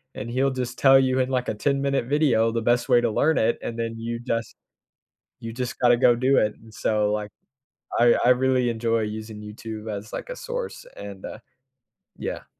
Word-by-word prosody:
and 115 Hz, -, -6 dB
he'll 135 Hz, +2 st, +1 dB
just 125 Hz, -1 st, -4 dB
tell 135 Hz, -1 st, +7 dB
you 130 Hz, -1 st, +1 dB
in, 130 Hz, 0 st, +1 dB
like, 125 Hz, -1 st, -1 dB
a -, -, 0 dB
ten-minute 140 Hz, +2 st, 0 dB
video 130 Hz, -6 st, +2 dB
the 115 Hz, -, -1 dB
best 120 Hz, +1 st, +1 dB
way 120 Hz, -, +5 dB
to 120 Hz, -, +1 dB
learn 155 Hz, +8 st, +2 dB
it, 110 Hz, +1 st, +2 dB
and 115 Hz, -, -4 dB
then 115 Hz, 0 st, -2 dB
you 115 Hz, +1 st, -4 dB
just 115 Hz, -2 st, -3 dB, 0.8 s
you 115 Hz, 0 st, -6 dB
just 125 Hz, 0 st, -4 dB
gotta 120 Hz, -1 st, +5 dB
go 120 Hz, -1 st, +5 dB
do 130 Hz, +3 st, +2 dB
it, 105 Hz, -1 st, +2 dB
and 110 Hz, -1 st, -17 dB
so, 105 Hz, -1 st, 0 dB
like, 105 Hz, 0 st, -2 dB, 0.7 s
I 120 Hz, 0 st, +6 dB
I 125 Hz, -, +5 dB
really 125 Hz, -1 st, +3 dB
enjoy 115 Hz, 0 st, 0 dB
using 110 Hz, 0 st, -6 dB
YouTube 110 Hz, +1 st, -8 dB
as, 105 Hz, +2 st, -6 dB
like, -, -, -5 dB
a -, -, -4 dB
source, -, -, -5 dB
and, 100 Hz, -1 st, -9 dB
uh, -, -, -8 dB, 0.8 s
yeah. -, -, -5 dB
120 Hz, 200 wpm, -24 LUFS, 110-130 Hz, 0.8 s, tell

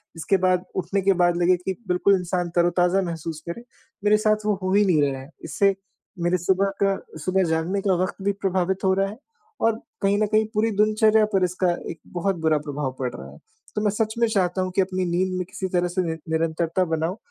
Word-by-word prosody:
इसके 165 Hz, +4 st, +1 dB
बाद 185 Hz, -1 st, +2 dB
उठने 190 Hz, +2 st, -1 dB
के 195 Hz, +1 st, +4 dB
बाद 175 Hz, 0 st, +3 dB
लगे 180 Hz, +1 st, +5 dB
कि 190 Hz, +2 st, -4 dB
बिल्कुल 180 Hz, +2 st, +3 dB
इंसान 180 Hz, -1 st, -2 dB
तरोताज़ा 175 Hz, +2 st, +3 dB
महसूस 165 Hz, -3 st, -5 dB
करे 235 Hz, +7 st, -6 dB, 0.4 s
मेरे 210 Hz, 0 st, +5 dB
साथ 215 Hz, 0 st, +1 dB
वो 210 Hz, -1 st, +2 dB
हो 185 Hz, -, 0 dB
ही 205 Hz, +1 st, +5 dB
नहीं 165 Hz, -5 st, +3 dB
रहा 135 Hz, -1 st, -6 dB
है। 135 Hz, -, -12 dB, 0.2 s
इससे 200 Hz, -1 st, +2 dB, 0.4 s
मेरे 175 Hz, +1 st, +1 dB
सुबह 190 Hz, +3 st, +1 dB
का 195 Hz, -1 st, +2 dB, 0.3 s
सुबह 190 Hz, +1 st, +2 dB
जागने 165 Hz, +5 st, 0 dB
का 195 Hz, -1 st, +2 dB
वक़्त 185 Hz, -, -3 dB
भी 200 Hz, -, +3 dB
प्रभावित 190 Hz, 0 st, 0 dB
हो 190 Hz, -, +4 dB
रहा 195 Hz, +1 st, +1 dB
है 215 Hz, -, -9 dB, 0.4 s
और 225 Hz, 0 st, +2 dB, 0.2 s
कहीं 200 Hz, +1 st, +2 dB
न -, -, +1 dB
कहीं 215 Hz, +1 st, +2 dB
पूरी 220 Hz, +2 st, +1 dB
दिनचर्या 215 Hz, 0 st, +4 dB
पर 190 Hz, -1 st, +3 dB
इसका 180 Hz, 0 st, +1 dB, 0.2 s
एक 165 Hz, -, -10 dB
बहुत 185 Hz, +2 st, 0 dB
बुरा 155 Hz, -1 st, +4 dB
प्रभाव 145 Hz, -2 st, -2 dB
पड़ 125 Hz, -2 st, -2 dB
रहा -, -, -9 dB
है। -, -, -14 dB, 0.4 s
तो 210 Hz, -, 0 dB
मैं 210 Hz, -, +2 dB
सच 220 Hz, +1 st, -1 dB
में 235 Hz, -, +4 dB
चाहता 190 Hz, -4 st, 0 dB
हूँ 185 Hz, 0 st, -2 dB
कि 195 Hz, -, +4 dB
अपनी 185 Hz, -1 st, -1 dB
नींद 185 Hz, +2 st, 0 dB
में 180 Hz, -, -2 dB
किसी 190 Hz, -, -4 dB
तरह 175 Hz, 0 st, +2 dB
से 175 Hz, +1 st, -1 dB
निर 160 Hz, -1 st, -3 dB
निरंतरता 165 Hz, +2 st, 0 dB
बनाऊँ, 165 Hz, +3 st, -2 dB
185 Hz, 220 wpm, -24 LUFS, 175-200 Hz, 0.4 s, लगे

